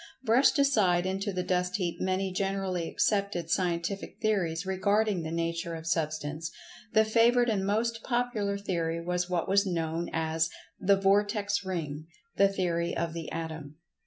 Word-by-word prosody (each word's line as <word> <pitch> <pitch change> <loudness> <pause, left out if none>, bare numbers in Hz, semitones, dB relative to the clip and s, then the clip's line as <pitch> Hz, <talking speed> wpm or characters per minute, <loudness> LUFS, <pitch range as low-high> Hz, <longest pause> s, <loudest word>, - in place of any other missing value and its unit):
brushed 255 +5 +4
aside 205 -11 +3
into 195 +2 -1
the 180 -1 -2
dust 180 0 0
heap 180 -4 -2
many 190 +1 0
generally 190 -3 -1
accepted 200 -5 0
scientific 180 +1 -1
theories 190 -6 0
regarding 200 +1 +1
the 160 - -4
nature 165 +1 -2
of 160 0 -8
Substance, 155 -1 -2 0.4
the 220 0 +4
favorite 235 +2 +4
and 200 -3 0
most 230 +2 0
popular 240 -5 -1
theory 170 -4 -2
was 180 +1 -2
what 175 -2 0
was 200 +1 +4
known 165 -1 -2
as 160 0 0 0.3
the 200 +1 +4
"Vortex 205 +1 +2
ring" 160 -5 -4 0.3
theory 180 -4 +1
of 170 -1 -2
the 165 -2 -6
Atom. 160 -3 -5
185 Hz, 145 wpm, -29 LUFS, 165-200 Hz, 0.4 s, brushed